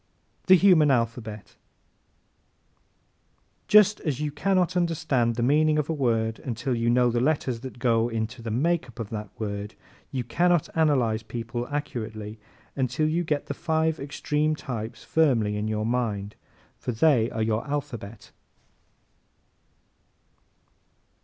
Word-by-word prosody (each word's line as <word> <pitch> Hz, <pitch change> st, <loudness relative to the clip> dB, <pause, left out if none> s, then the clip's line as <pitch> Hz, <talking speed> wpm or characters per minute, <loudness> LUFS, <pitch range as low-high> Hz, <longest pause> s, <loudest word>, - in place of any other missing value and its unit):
The 185 Hz, -, +9 dB
Human 175 Hz, -5 st, +5 dB
Alphabet 115 Hz, -4 st, -1 dB
¶ -, -, -27 dB, 2.1 s
Just 210 Hz, 0 st, +6 dB
as 145 Hz, -5 st, -2 dB
you 150 Hz, -1 st, -2 dB
can 195 Hz, +7 st, 0 dB
not 185 Hz, 0 st, +1 dB
understand 150 Hz, -9 st, +1 dB
the 120 Hz, -, -1 dB
meaning 155 Hz, +4 st, +3 dB
of 150 Hz, +1 st, 0 dB
a -, -, 0 dB
word 115 Hz, -6 st, 0 dB
until 125 Hz, +1 st, -3 dB
you 115 Hz, 0 st, 0 dB
know 120 Hz, 0 st, +3 dB
the 120 Hz, -, 0 dB
letters 130 Hz, -3 st, 0 dB
that 130 Hz, 0 st, -9 dB
go 115 Hz, -2 st, +2 dB
into 115 Hz, +2 st, -4 dB
the 115 Hz, -, -5 dB
makeup 130 Hz, 0 st, -1 dB
of 110 Hz, -3 st, -5 dB
that 105 Hz, -2 st, -5 dB
word, 105 Hz, -1 st, -4 dB, 0.3 s
you 130 Hz, -2 st, -3 dB
cannot 175 Hz, +7 st, +1 dB
analyze 130 Hz, -9 st, +2 dB
people 120 Hz, +2 st, -5 dB
accurately 110 Hz, -7 st, -5 dB, 0.4 s
until 130 Hz, +3 st, 0 dB
you 165 Hz, +3 st, 0 dB
get 150 Hz, -3 st, -1 dB
these 140 Hz, -, -5 dB
five 160 Hz, -1 st, 0 dB
extreme 150 Hz, +2 st, -1 dB
types 115 Hz, -5 st, -6 dB
firmly 120 Hz, -10 st, +2 dB
in 105 Hz, +1 st, -2 dB
your 110 Hz, 0 st, -1 dB
mind, 110 Hz, -4 st, -1 dB, 0.5 s
for -, -, -3 dB
they 120 Hz, -1 st, +3 dB
are 110 Hz, -2 st, -2 dB
your 110 Hz, 0 st, 0 dB
alphabet. 125 Hz, -8 st, -5 dB
125 Hz, 140 wpm, -26 LUFS, 115-155 Hz, 2.1 s, The